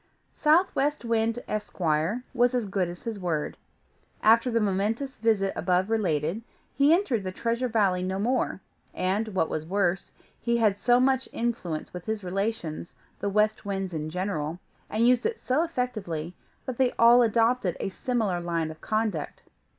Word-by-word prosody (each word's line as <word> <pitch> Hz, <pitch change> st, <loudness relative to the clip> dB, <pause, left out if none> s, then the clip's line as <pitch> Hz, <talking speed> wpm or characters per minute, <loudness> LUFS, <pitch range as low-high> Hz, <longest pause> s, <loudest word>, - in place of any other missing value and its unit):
Southwest 300 Hz, -4 st, +2 dB
Wind, 230 Hz, +1 st, 0 dB
Esquire, 190 Hz, 0 st, -1 dB
was 245 Hz, +1 st, +3 dB
as 245 Hz, -3 st, 0 dB
good 195 Hz, -2 st, -1 dB
as 175 Hz, 0 st, -9 dB
his 225 Hz, -3 st, -4 dB
word. 165 Hz, -5 st, -2 dB, 0.7 s
After 230 Hz, +3 st, +5 dB
the 230 Hz, -1 st, +2 dB
momentous 215 Hz, +7 st, -1 dB
visit 215 Hz, -3 st, +1 dB
above 185 Hz, +3 st, +1 dB
related, 175 Hz, -3 st, 0 dB, 0.3 s
he 280 Hz, +3 st, +4 dB
entered 310 Hz, -, +2 dB
the 185 Hz, -, -3 dB
Treasure 235 Hz, +5 st, -1 dB
Valley 200 Hz, -6 st, +2 dB
no 190 Hz, +1 st, -2 dB
more; 235 Hz, -1 st, 0 dB, 0.3 s
and, 195 Hz, +4 st, 0 dB
what 190 Hz, -6 st, 0 dB
was 155 Hz, -, -3 dB
worse, 185 Hz, +1 st, 0 dB, 0.3 s
he 235 Hz, 0 st, +1 dB
had 210 Hz, -3 st, +2 dB
so 245 Hz, +3 st, +4 dB
much 265 Hz, 0 st, +2 dB
influence 225 Hz, -10 st, -3 dB
with 180 Hz, +1 st, -8 dB
his 220 Hz, -2 st, -2 dB
relations, 185 Hz, -3 st, -3 dB, 0.2 s
the 200 Hz, -, -1 dB
West 215 Hz, +2 st, +1 dB
Winds 195 Hz, -2 st, -3 dB
in 155 Hz, -1 st, -3 dB
general, 170 Hz, -3 st, -3 dB, 0.3 s
and 225 Hz, +2 st, +2 dB
used 250 Hz, -1 st, +4 dB
it 450 Hz, -, -4 dB
so 260 Hz, +5 st, 0 dB
effectually, 215 Hz, -, -3 dB, 0.3 s
that 255 Hz, -1 st, -5 dB
they 255 Hz, -2 st, +3 dB
all 235 Hz, +1 st, +7 dB
adopted 230 Hz, -4 st, +2 dB
a -, -, -2 dB
similar 215 Hz, -4 st, -1 dB
line 165 Hz, -2 st, -1 dB
of 155 Hz, -, -13 dB
conduct. 215 Hz, -7 st, -2 dB
215 Hz, 160 wpm, -27 LUFS, 180-240 Hz, 0.7 s, all